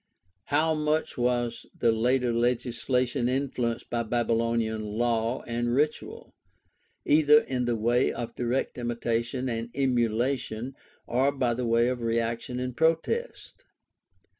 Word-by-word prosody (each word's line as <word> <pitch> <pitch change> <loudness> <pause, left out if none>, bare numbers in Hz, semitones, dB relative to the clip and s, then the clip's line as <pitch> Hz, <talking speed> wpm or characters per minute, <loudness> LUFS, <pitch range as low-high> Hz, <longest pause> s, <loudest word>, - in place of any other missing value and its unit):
How 155 +2 +2
much 155 +1 0
was 120 -1 -1
the 115 - +3
later 125 +2 +1
legislation 125 +1 0
influenced 125 -3 -2
by 120 - 0
Babylonian 115 -1 0
law 115 +2 -1
and 120 +1 -1
ritual, 150 +2 -2 0.7
either 150 0 +6
in 125 -2 -2
the 120 -1 +1
way 120 +3 +2
of 120 -1 -5
direct 125 +1 -2
imitation 120 +1 -2
and 115 -1 -3
emulation 125 -1 0 0.3
or 130 +4 +2
by 130 -4 0
way 115 -1 +2
of 125 -1 -2
reaction 115 +2 -1
and 125 -1 -4
protest 165 - -1
120 Hz, 115 wpm, -27 LUFS, 115-130 Hz, 0.7 s, either